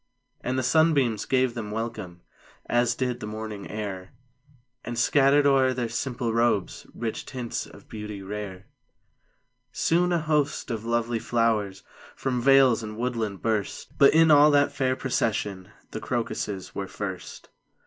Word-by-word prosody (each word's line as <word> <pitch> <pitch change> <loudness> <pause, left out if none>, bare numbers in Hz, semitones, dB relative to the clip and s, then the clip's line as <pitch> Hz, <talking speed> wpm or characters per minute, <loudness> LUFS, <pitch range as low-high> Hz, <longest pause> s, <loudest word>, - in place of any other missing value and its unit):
And 130 +1 -1
the 130 - 0
sunbeams 135 -5 +2
gave 130 -2 +1
them 110 -3 -5
welcome. 110 -5 -5 0.4
As 120 0 +1
did 125 -1 -2
the 105 - -6
morning 110 -1 -6
air 100 -3 -6 0.7
And 120 -1 -5
scattered 140 +3 +4
o'er 135 -2 +4
their 120 -2 -2
simple 120 0 -2
robes 115 -4 0
Rich 115 -2 -4
tints 125 -3 -4
of - - -16
beauty 105 -2 -7
rare. 100 -1 -6 1.1
Soon 175 +2 +1
a 175 - +3
host 150 -5 0
of 115 -1 -4
lovely 120 0 0
flowers 110 -5 0 0.3
From 125 -2 -2
vales 135 -2 +5
and 110 -1 -7
woodland 115 -5 -3
burst; 110 -3 -2
But 140 +1 +6
in 160 0 +6
all 145 0 +7
that 145 -1 +3
fair 130 -1 0
procession 105 -7 -2 0.2
The - - -5
crocuses 110 -4 -3
were 100 -1 -4
first. 95 -2 -7
115 Hz, 145 wpm, -26 LUFS, 105-130 Hz, 1.1 s, all